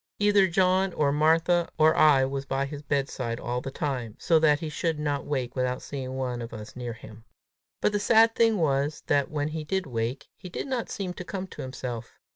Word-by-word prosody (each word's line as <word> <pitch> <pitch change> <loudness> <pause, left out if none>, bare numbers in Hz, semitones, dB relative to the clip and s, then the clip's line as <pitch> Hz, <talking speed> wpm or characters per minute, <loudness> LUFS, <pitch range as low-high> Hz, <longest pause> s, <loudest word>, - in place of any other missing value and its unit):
Either 205 -2 +4
John 185 +1 +2
or 145 -2 +2
Martha 165 +3 +3
or 155 0 +5
I 140 -4 +5
was 135 0 -3
by 135 +1 0
his 145 +1 -7
bedside 135 -5 -2
all 125 +1 -3
the 135 - -5
time, 130 -6 -3
so 165 -2 +3
that 150 -2 +4
he 160 - -4
should 160 +1 -1
not 145 -2 -2
wake 130 -4 -2
without 125 0 -1
seeing 130 -2 -5
one 125 -2 -2
of 115 0 -7
us 105 -1 -9
near 120 -2 -5
him. 110 0 -13 0.6
But - - +3
the 205 - 0
sad 225 +2 +5
thing 225 -2 +3
was, 145 -2 0
that, 140 +1 +2
when 150 -2 -2
he 155 0 -4
did 190 +4 -1
wake, 115 0 -3
he 180 - -10
did - - -4
not 260 -4 -3
seem 190 -3 -4
to 185 - -7
come 190 0 -5
to 185 - -9
himself. 125 -3 -6
145 Hz, 215 wpm, -27 LUFS, 130-175 Hz, 0.6 s, or